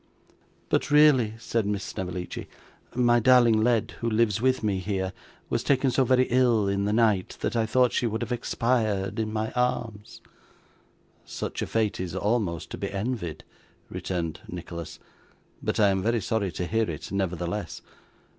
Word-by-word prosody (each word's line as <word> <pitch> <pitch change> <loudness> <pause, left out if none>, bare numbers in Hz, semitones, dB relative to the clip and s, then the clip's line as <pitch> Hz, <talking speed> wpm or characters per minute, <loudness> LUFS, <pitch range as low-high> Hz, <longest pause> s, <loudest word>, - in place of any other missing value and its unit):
'But - - +1
really,' 145 -7 +5
said 115 -2 -1
Miss 100 -1 -1
Snevellicci, 90 -1 -5 0.5
'my 120 -1 +4
darling 120 -2 +5
Led, 115 -1 +2
who 115 - -1
lives 110 -2 +1
with 130 -1 +2
me 100 -3 0
here, 95 -1 -2 0.3
was - - -1
taken 135 -1 +2
so 130 - +3
very 130 0 +4
ill 120 -5 +3
in 100 0 0
the 105 - 0
night 105 -4 +2
that - - -1
I 115 -1 +1
thought 125 0 +3
she 120 - +1
would 110 0 -2
have - - -6
expired 115 -4 0
in 110 -1 -1
my 110 0 -2
arms.' 115 -4 -2 1.0
'Such - - -5
a - - -2
fate 110 -2 0
is 90 -1 -4
almost 95 -6 -1
to - - -6
be 100 - -3
envied,' 100 -4 -3 0.5
returned 85 -3 -3
Nicholas, 85 -1 -7 0.6
'but - - -1
I 105 -2 +5
am 95 -1 +1
very 115 +3 +1
sorry 105 -2 -1
to 90 - -3
hear 110 +2 0
it 75 - -6
nevertheless. 90 -1 -3
110 Hz, 165 wpm, -26 LUFS, 95-120 Hz, 1.0 s, really